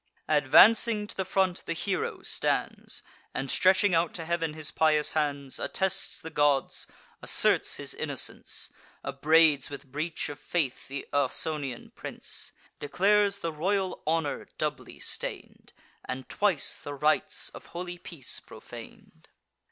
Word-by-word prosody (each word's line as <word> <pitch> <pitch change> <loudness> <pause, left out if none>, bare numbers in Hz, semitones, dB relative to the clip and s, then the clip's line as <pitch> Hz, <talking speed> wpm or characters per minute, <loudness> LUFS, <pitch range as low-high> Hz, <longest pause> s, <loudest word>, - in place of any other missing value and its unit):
Advancing 225 -1 +6
to - - -7
the 190 - -1
front, 190 -1 0
the 170 - 0
hero 190 +3 -2
stands, - - -2 0.3
And, 135 - -2
stretching 190 +1 +4
out 165 0 +2
to 165 - -4
heav'n 165 -2 -1
his 155 -1 -2
pious 155 -1 +3
hands, 140 -3 -1
Attests 190 -1 -1
the 160 - -8
gods, 145 -3 +1 0.3
asserts - - +4
his - - -3
innocence, - - -2 0.3
Upbraids 155 -3 +4
with 140 -2 -9
breach 155 +4 -2
of 145 0 -7
faith 150 -3 -2
th' 135 0 -4
Ausonian 140 -1 0
prince; - - -4 0.3
Declares 200 +6 +2
the 165 -1 -2
royal 190 +4 -1
honour 160 -3 0
doubly - - -3
stain'd, - - -5 0.3
And 130 0 -5
twice 200 -8 +1
the 145 - -6
rites 150 +2 +1
of - - -12
holy 175 0 -6
peace 165 -7 -3
profan'd. - - -13
160 Hz, 130 wpm, -28 LUFS, 145-185 Hz, 0.3 s, Advancing